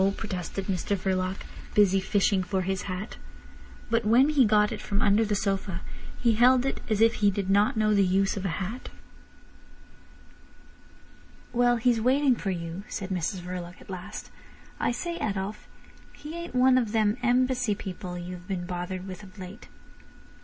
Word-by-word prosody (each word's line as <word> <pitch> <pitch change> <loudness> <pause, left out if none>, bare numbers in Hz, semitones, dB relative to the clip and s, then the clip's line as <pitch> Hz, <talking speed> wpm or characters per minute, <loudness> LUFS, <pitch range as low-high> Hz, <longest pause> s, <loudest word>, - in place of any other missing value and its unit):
protested 195 -2 -4
Mr 195 +1 -1
Verloc, 185 0 -1 0.3
busy 195 -2 +5
fishing 195 0 +2
for 185 +1 -1
his 190 +1 -3
hat. 185 +4 -5 0.7
But 230 0 +2
when 240 +7 +5
he 285 -5 +5
got 210 0 +4
it - - -5
from 200 - -1
under 210 0 +4
the 210 -1 0
sofa 195 -3 -1 0.4
he 235 - +3
held 250 +3 +5
it 270 - -2
as 215 -1 +1
if 230 +1 +5
he 205 - +6
did 195 -1 -1
not 205 +2 +3
know 215 -1 +3
the 200 -1 +4
use 195 +1 +2
of 195 - -4
a - - 0
hat. 210 +7 -5 2.6
"Well—he's 240 -1 +3
waiting 260 +2 +3
for 205 - -4
you," 170 0 -4
said 195 -2 -5
Mrs 185 0 -2
Verloc 180 0 -7
at - - -12
last. 180 -1 -7 0.5
"I - - +1
say, 340 +8 -4
Adolf, 200 - -3 0.5
he 300 +2 -9
ain't 340 -4 -6
one 255 0 +5
of 230 -3 -2
them 215 0 +2
Embassy 250 -2 +2
people 185 -2 -6
you 175 +1 -6
have 180 0 -10
been 185 -3 -3
bothered 180 +1 -4
with 190 +1 -7
of 195 0 -14
late?" 190 +4 -9
200 Hz, 165 wpm, -27 LUFS, 185-230 Hz, 2.6 s, he